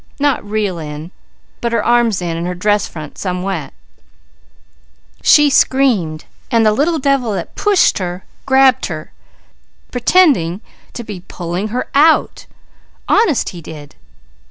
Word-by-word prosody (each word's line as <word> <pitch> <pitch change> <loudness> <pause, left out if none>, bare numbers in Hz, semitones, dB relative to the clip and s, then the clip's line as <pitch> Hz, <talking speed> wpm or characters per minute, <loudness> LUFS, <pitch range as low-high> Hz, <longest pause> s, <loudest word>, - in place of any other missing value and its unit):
Not 285 -1 +1
real 205 -4 -2
in, 155 +2 -7 0.5
but 235 -1 -2
her 230 - 0
arms 235 -6 +2
in, 170 -1 -2
and 170 +1 -3
her 180 - -3
dress 205 +3 +1
front 155 -3 -10
some 180 -2 -3
wet. 195 0 -4 1.5
"She 295 -1 +6
screamed 225 - +2 0.2
while 230 -3 +3
the 215 - +4
little 305 +9 +1
devil 270 -6 0
that 180 -3 -5
pushed 410 - +2
her 180 0 -5 0.2
grabbed 265 -1 +4
her, 155 -3 -7 0.8
pretending 245 - +2 0.3
to 240 - -6
be 210 -4 -7
pulling 175 +3 -4
her 245 +4 -3
out. 310 +3 +3 0.6
Honest 390 - +2
he 175 - -10
did! 150 -2 -11
210 Hz, 135 wpm, -16 LUFS, 175-265 Hz, 1.5 s, She